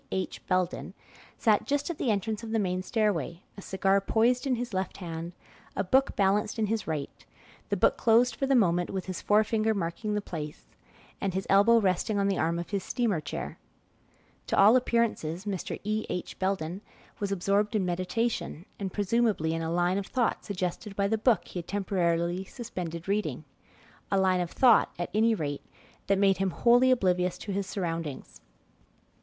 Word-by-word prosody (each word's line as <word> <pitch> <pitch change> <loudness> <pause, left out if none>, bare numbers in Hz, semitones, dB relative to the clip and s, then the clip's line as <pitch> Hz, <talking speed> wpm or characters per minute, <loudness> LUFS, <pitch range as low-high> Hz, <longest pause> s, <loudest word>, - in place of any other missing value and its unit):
H. 190 -1 -3
Belden, 185 -1 -1 0.4
sat 215 -3 +2
just 285 +3 0
at 330 - -8
the 250 - 0
entrance 215 +1 -1
of 230 - -7
the 225 - 0
main 185 -3 0
stairway, 185 - -1
a 200 - -9
cigar 195 +1 +1
poised 240 +6 +2
in 260 - +2
his 240 -2 -5
left 190 0 -2
hand, 170 -1 -6 0.4
a 195 - 0
book 265 +8 +2
balanced 205 +2 +1
in 220 - +1
his 220 0 -2
right; 150 -3 -4 0.5
the - - 0
book - - +3
closed 235 +1 +4
for 270 - -1
the 270 - +3
moment, 175 -6 +3
with 190 -2 -4
his 185 -2 -5
forefinger 215 +1 +2
marking 200 +4 -2
the - - +1
place, 155 -6 -7 0.6
and 195 -2 -1
his 190 - -1
elbow 205 +4 +6
resting 200 +1 0
on 200 0 +2
the 195 -2 +1
arm 165 +1 +1
of 170 +3 -5
his 200 -2 -1
steamer 220 -10 0
chair. 145 - -6 0.9
To - - 0
all 210 +5 +7
appearances, 230 -8 0
Mr. 195 -4 -4
E. 215 +1 -2
H. 180 - -5
Belden 185 -1 -2 0.4
was 200 -1 -2
absorbed 200 +3 +1
in 200 -3 +1
meditation, 185 0 -2
and 195 -2 -3
presumably 205 -5 +1
in 165 - -2
a 160 - -2
line 175 +2 +1
of 195 - -6
thought 245 -3 0
suggested 195 +1 -4
by 200 0 +1
the 220 - +1
book 230 -1 +3
be 180 - -7
had 170 - -8
temporarily 175 -3 0
suspended 180 -7 -6
reading 205 +2 -1 0.7
a 195 - +2
line 185 -1 +3
of 175 - -2
thought, 240 0 +4
at 175 - -4
any 225 +2 +3
rate, 145 -6 -3 0.5
that 195 - +3
made 195 -1 +4
him 195 0 +1
wholly 245 +7 +4
oblivious 180 -7 +2
to 205 - -6
his 195 0 -2
surroundings. 165 -7 -4
195 Hz, 185 wpm, -28 LUFS, 180-220 Hz, 0.9 s, all